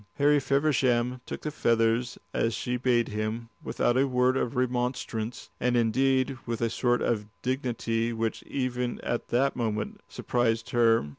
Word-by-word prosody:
Harry 145 0 +4
Feversham 130 -3 +1
took - - -5
the 150 - -3
feathers 115 -2 +1 0.2
as 115 0 +1
she 125 - -2
bade 125 -1 +2
him, 110 +2 -3
without 120 - +1
a 135 +2 +3
word 125 0 +2
of 125 -1 -1
remonstrance, 125 -2 -2
and 125 0 +2
indeed 130 +3 +2
with 115 -1 -2
a 115 -1 0
sort 120 0 +1
of 105 -3 0 0.2
dignity 120 -3 -1
which 115 -1 -2
even 125 -2 -2
at 120 - -2
that 135 +3 +1
moment 110 -3 -2
surprised 115 -2 0
her. 115 -5 +4
120 Hz, 150 wpm, -28 LUFS, 115-130 Hz, 0.2 s, Harry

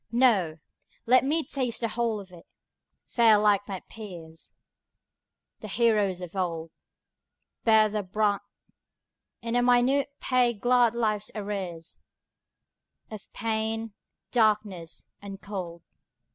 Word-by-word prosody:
No! 215 -10 +3 0.5
let 255 +2 +5
me 310 +4 +1
taste 250 -4 -2
the 230 - 0
whole 230 -2 -1
of 190 -2 -12
it, 175 -2 -15 0.6
fare 225 -3 +4
like 205 -1 +2
my 190 -2 -5
peers 170 -7 -11 1.1
The 215 - -8
heroes 210 -4 +1
of 180 +1 -8
old, 165 -3 -3 0.9
Bear 220 -1 +6
the 210 0 -2
brunt, 205 +1 0 1.0
in 230 0 -2
a 245 - +4
minute 250 +3 +3
pay 250 -2 +2
glad 240 +1 +3
life's 215 -3 0
arrears 190 -6 -5 1.1
Of 215 -2 -10
pain, 225 0 -2 0.4
darkness, 210 -7 0
and 200 -1 -8
cold. 180 -5 -7
215 Hz, 115 wpm, -27 LUFS, 190-235 Hz, 1.1 s, Bear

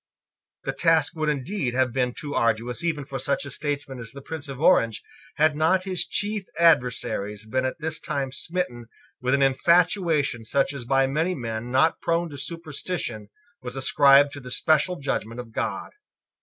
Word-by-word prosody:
The - - -2
task 165 0 +2
would 155 -1 0
indeed 140 -2 -2
have 130 -2 +2
been 125 -1 0
too 145 -2 -5
arduous 115 +6 0
even 155 -4 -1
for 135 -1 -5
such 140 +2 -1
a 140 - -7
statesman 140 -2 -4
as 115 -1 -8
the 140 - -9
Prince 155 -2 -7
of 135 -1 -7
Orange, 115 - +3 0.3
had 155 0 +3
not 165 +5 +2
his 185 -2 -2
chief 205 -2 -2
adversaries 125 -9 +2
been 130 +4 -1
at 130 - -2
this 160 0 -4
time 135 -2 -3
smitten 140 -5 -3 0.3
with 125 +2 +2
an 140 - +2
infatuation 155 - +2
such 135 +5 0
as 130 -4 -6
by 135 +2 +3
many 160 +7 0
men 115 -2 -4
not 135 +6 +2
prone 170 -1 0
to 145 - -8
superstition 155 - -5 0.3
was 125 +1 -6
ascribed 140 +1 +5
to 145 - -7
the 125 -2 -10
special 155 +7 +2
judgment 125 -6 -3
of 120 -2 -8
God. - - -3
140 Hz, 175 wpm, -25 LUFS, 125-160 Hz, 0.3 s, ascribed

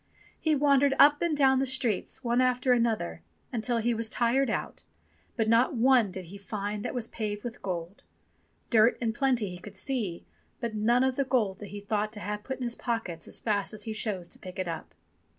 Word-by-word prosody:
He 315 -1 +2
wandered 280 -1 +4
up 290 +1 +7
and 335 -3 +1
down 265 -2 +5
the 270 - +1
streets, 255 -2 -1
one 240 +1 +2
after 255 0 +3
another, 220 - 0 0.3
until 240 +1 0
he 235 +1 +1
was 225 0 -2
tired 245 +4 +2
out, - - -3 0.6
but 225 -2 +1
not 230 +4 +4
one 245 -2 +4
did 185 0 -6
he 195 +4 -10
find 205 +1 -4
that - - -4
was 240 -3 -1
paved 210 -3 -4
with 240 -1 -6
gold. 175 0 -5 0.7
Dirt 225 0 +5
in 230 -2 0
plenty 245 -6 +1
he 180 - -8
could 200 +1 -11
see, 215 -9 -2 0.3
but 235 -3 -3
none 235 +4 +3
of 260 -1 +1
the 275 - +3
gold 225 -8 0
that 205 - -7
he 205 +2 -7
thought 210 +1 -1
to 210 - -5
have 210 +1 -4
put 265 +3 -4
in 255 - -5
his 240 -1 0
pockets 225 -10 -4
as - - -4
fast 205 -1 -1
as 210 - -3
he 220 - -4
chose 205 -5 -3
to - - -9
pick 185 +1 -9
it 185 -1 -2
up. 165 -1 -6
225 Hz, 215 wpm, -29 LUFS, 205-255 Hz, 0.7 s, up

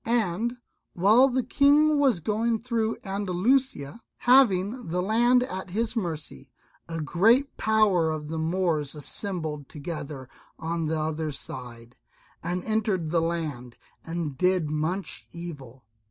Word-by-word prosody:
And 230 +1 0 0.4
while 215 +9 +5
the 255 0 0
King 290 +4 +4
was 260 -11 +3
going 225 +5 0
through 230 -3 -1
Andalusia, 200 - 0 0.2
having 240 -3 +3
the 175 +2 -1
land 240 +6 +3
at 190 -6 -5
his 220 +5 -1
mercy, 160 - -5 0.4
a 165 0 -4
great 225 - +3
power 210 -7 +3
of 155 -1 -4
the 160 +1 -4
Moors 160 -3 0
assembled 150 -1 -3
together 150 -3 -6 0.3
on 165 0 -2
the 160 0 -1
other 155 0 -2
side, 120 -4 -8 0.5
and 180 0 -3
entered 210 -7 -1
the 170 -1 +2
land, 150 -8 -3 0.3
and 165 -4 -4
did 180 -2 +1
much 160 +6 -2
evil. 140 -8 -9
180 Hz, 125 wpm, -26 LUFS, 155-225 Hz, 0.5 s, while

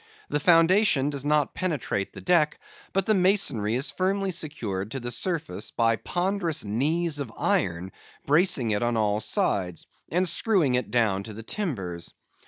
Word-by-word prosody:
The 150 - 0
foundation 165 -2 +4
does 140 -2 -4
not 150 -1 +1
penetrate 150 - -2
the - - -10
deck, 165 -4 +2 0.3
but 195 -1 0
the 215 - +3
masonry 180 - +2
is 130 +4 -1
firmly 195 +1 -1
secured 110 - -4
to 135 - -4
the 120 0 -4
surface 120 - -2
by 115 -1 +2
ponderous 175 - -1
knees 150 +9 0
of 135 -5 -5
iron 90 0 0 0.3
bracing 145 - +3
it 105 - 0
on 120 -1 0
all 105 -1 +1
sides, 90 -5 -1 0.3
and 180 +2 +2
screwing 170 - +2
it 125 0 0
down 110 -5 +1
to 110 - -8
the 115 +2 -9
timbers. 95 - -4
140 Hz, 160 wpm, -26 LUFS, 110-175 Hz, 0.3 s, foundation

